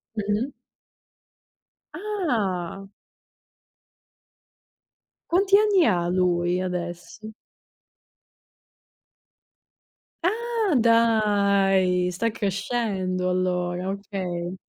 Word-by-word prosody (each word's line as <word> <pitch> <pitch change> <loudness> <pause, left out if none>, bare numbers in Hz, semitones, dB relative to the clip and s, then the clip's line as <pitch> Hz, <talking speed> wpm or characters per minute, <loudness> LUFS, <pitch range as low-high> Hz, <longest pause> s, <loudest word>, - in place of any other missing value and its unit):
Mh-mh. 210 +5 -1 1.4
Ah. 225 - -2 2.4
Quanti 390 +3 +4
anni 415 -3 +4
ha 175 -6 +1
lui 180 0 +1
adesso? 180 +3 -5 2.9
Ah, 450 -1 0
dai, 200 -6 +3
sta 230 +6 -1
crescendo 195 -3 -2
allora, 180 0 -1
okay. 185 -3 -5
195 Hz, 55 wpm, -24 LUFS, 180-230 Hz, 2.9 s, Quanti